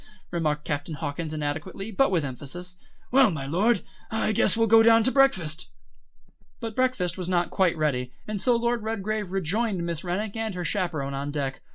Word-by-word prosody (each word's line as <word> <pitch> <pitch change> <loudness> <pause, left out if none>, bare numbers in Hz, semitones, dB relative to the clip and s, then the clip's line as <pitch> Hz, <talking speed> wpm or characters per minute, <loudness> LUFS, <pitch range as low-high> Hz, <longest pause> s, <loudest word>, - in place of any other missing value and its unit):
remarked 150 -3 -1
Captain 145 +1 -3
Hawkins 155 +1 -4
inadequately, 155 +7 -4
but 270 +7 +3
with 170 -6 +1
emphasis. 175 +8 -6 0.3
"Well, 265 -1 +6
my 150 -7 -4
Lord, 195 +9 +2 0.3
I 220 -1 0
guess 215 - +2
we'll 225 - +4
go 225 +1 +7
down 225 0 +6
to 260 - +3
breakfast." 185 - +2 0.9
But 225 -2 -5
breakfast 200 -9 0
was 180 -1 -3
not 175 -1 +1
quite 180 -3 +2
ready, 125 -5 0 0.2
and 210 -2 -1
so 245 -2 +4
Lord 235 0 0
Redgrave 215 -2 -2
rejoined 195 +1 -1
Miss 170 -2 -3
Rennick 195 +4 -2
and 220 -3 -2
her 180 -1 -3
chaperon 160 -6 -1
on 140 +1 -3
deck. 140 -2 -3
180 Hz, 180 wpm, -26 LUFS, 155-220 Hz, 0.9 s, go